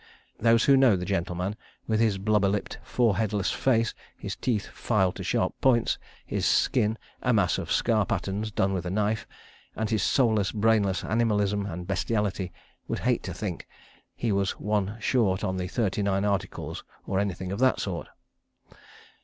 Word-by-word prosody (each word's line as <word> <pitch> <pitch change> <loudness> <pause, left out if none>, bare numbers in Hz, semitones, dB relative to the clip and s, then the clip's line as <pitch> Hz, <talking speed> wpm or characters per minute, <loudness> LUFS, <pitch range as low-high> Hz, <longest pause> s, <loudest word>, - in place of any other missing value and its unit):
Those 115 0 +4
who 140 - +6
know 130 -6 +5
the 90 -1 -3
gentleman, 90 +1 -2 0.3
with 110 -1 +1
his 110 -4 +2
blubber 100 0 +2
lipped, 100 +1 -3
foreheadless 105 -4 +1
face, 115 -3 +1 0.2
his - - -5
teeth 110 -5 -1
filed 95 -5 0
to - - -5
sharp - - 0
points, 120 -3 +3 0.3
his - - -2
skin 110 +2 +2 0.2
a 125 - +2
mass 100 -5 +2
of - - -5
scar 110 -3 +3
patterns, 100 0 -2
done 95 -2 0
with 90 -1 -2
a - - -1
knife, 105 +3 0 0.5
and 110 0 -2
his 110 - +2
soulless, 110 -7 +2
brainless 105 -3 +2
animalism 105 -3 +1
and 90 -1 -5
bestiality, 95 0 -1 0.4
would - - -2
hate - - +1
to - - -5
think - - -5 0.5
he 115 - -1
was 100 -1 0
one 105 0 -1
short 105 -5 +1
on 95 -2 -1
the 90 0 -2
Thirty 105 +1 -1
Nine 100 0 +1
Articles 100 -2 -2 0.2
or 95 0 0
anything 95 -2 -2
of 100 - -3
that 130 0 +3
sort.) 90 -4 -3
105 Hz, 165 wpm, -27 LUFS, 95-110 Hz, 0.5 s, who